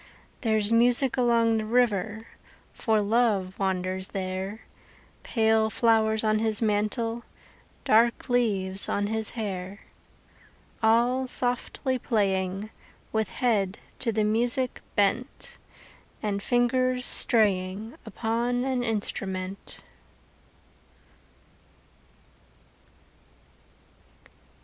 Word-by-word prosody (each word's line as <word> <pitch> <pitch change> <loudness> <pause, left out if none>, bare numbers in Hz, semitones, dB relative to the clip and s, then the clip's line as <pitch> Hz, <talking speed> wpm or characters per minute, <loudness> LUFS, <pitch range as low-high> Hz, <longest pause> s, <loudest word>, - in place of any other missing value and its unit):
There's 220 -2 +1
music 245 +2 +4
along 235 -2 +2
the 215 - -3
river 220 -2 0 0.5
For 220 -3 +1
Love 205 -3 +1
wanders 185 -1 -2
there, 190 +2 -5 0.6
Pale 220 -1 +2
flowers 220 -1 +2
on 215 0 +2
his 220 -1 +1
mantle, 225 +2 -1 0.6
Dark 230 +3 +3
leaves 200 -6 +1
on 205 - 0
his 220 +1 -1
hair. 195 -2 -5 1.0
All 240 +4 +2
softly 255 +1 -2
playing, 195 -3 -1 0.4
With 220 -2 -1
head 205 -5 0 0.2
to 235 - -1
the 215 0 0
music 240 +4 0
bent, 210 +6 -1 0.6
And 200 -1 -2
fingers 250 +2 +1
straying 205 -1 +2
Upon 235 +2 -2
an 260 -2 -1
instrument. 195 -4 -3
220 Hz, 85 wpm, -26 LUFS, 200-240 Hz, 1.0 s, music